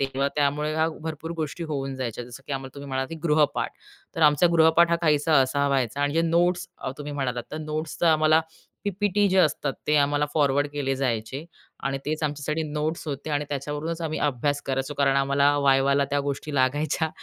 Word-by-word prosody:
तेव्हा 135 0 0
त्यामुळे 150 +1 +1 0.3
भरपूर 160 +1 -5
गोष्टी 160 +2 -4
होऊन 135 -3 -3
जायच्या. 120 -2 -4
जसं 125 +3 -11
की 145 - -5
आम्हाला 135 0 -5
तुम्ही 140 0 -8
म्हणाला 130 0 -1
की - - -8
गृहपाठ, 150 -2 +2 0.5
तर 165 - 0
आमचा 150 +3 +5
गृहपाठ 165 +1 +5
हा 170 - +3
काहीसा 150 -1 +4
असा 140 +2 +1
व्हायचा 135 -1 0
आणि 145 0 +1
जे 165 - +3
नोट्स 175 +2 +1
अ, - - -4
तुम्ही 145 0 -6
म्हणालात, 125 -4 -2
तर 155 - -3
नोट्स 155 0 -4
तर 170 - +3
आम्हाला 155 0 +5 0.4
पी-पी-टी 205 +1 +1
जे 190 - +2
असतात, 150 -4 +2
ते 150 0 +3
आम्हाला 145 +1 +2
फॉरवर्ड 145 -1 +2
केले 145 -2 -2
जायचे 130 +2 -2 0.4
आणि 135 0 -1
तेच 155 +1 -2
आमच्यासाठी 150 +1 -2
नोट्स 155 +2 -2
होते 145 +2 -5
आणि 145 0 0
त्याच्यावरूनच 150 +4 -4
आम्ही 155 -1 -2
अभ्यास 145 0 0
करायचो 135 +2 -2
कारण 135 -1 +3
आम्हाला 140 +1 +3
वायवाला 140 0 +3
त्या 145 0 +1
गोष्टी 145 +1 -4
लागायच्या 145 +4 +1
145 Hz, 190 wpm, -25 LUFS, 135-155 Hz, 0.5 s, आमचा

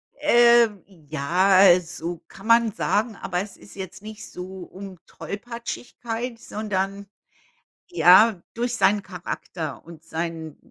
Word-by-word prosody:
Äh, 240 -5 +5 0.2
ja, 180 +3 +4
so 170 -1 -6
kann 195 - -13
man 230 -1 +5
sagen, 215 +2 0
aber 180 -1 -3
es 200 0 -8
ist - - -16
jetzt 190 0 -8
nicht 215 0 -10
so 185 +1 -8
um 190 +1 -10
Tollpatschigkeit, 235 +1 -6
sondern, 200 -2 -3 0.8
ja, 195 - +6
durch 240 +1 -2
seinen 205 -2 +3
Charakter 175 -4 -6
und 165 -1 -13
sein, 160 -1 -5
195 Hz, 120 wpm, -24 LUFS, 175-225 Hz, 0.8 s, ja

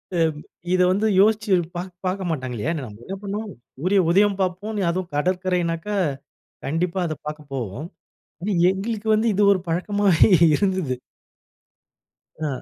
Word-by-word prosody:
அ, - - +1 0.5
இத 185 - +3
வந்து 205 +4 +1
யோசிச்சு 215 -1 +3 0.2
பா 175 - -2 0.2
பார்க்க 185 0 -1
மாட்டாங்க 130 -6 -3
இல்லையா? 150 +10 -1
நம்ம 105 0 -12
என்ன 195 - -5
பண்ணுவோம்? 205 +1 -4 0.3
சூரிய 185 +8 +2
உதயம் 200 +2 +3
பார்ப்போம் 195 +4 -2
அதுவும் 180 0 -3
கடற்கரைனாக்கா, 180 +2 -1 0.7
கண்டிப்பா 170 +5 -1
அத 155 -2 -2
பார்க்க 150 -1 -7
போவோம். 125 - -4 0.5
ஆனா, 200 +4 -2 0.2
எங்களுக்கு 215 +3 -4
வந்து 215 +2 +1
இது 205 - +2
ஒரு 185 - +1
பழக்கமாவே 195 +2 +3 0.2
இருந்தது. 185 -6 0 1.5
ஆ. - - 0
185 Hz, 135 wpm, -23 LUFS, 165-205 Hz, 1.5 s, இத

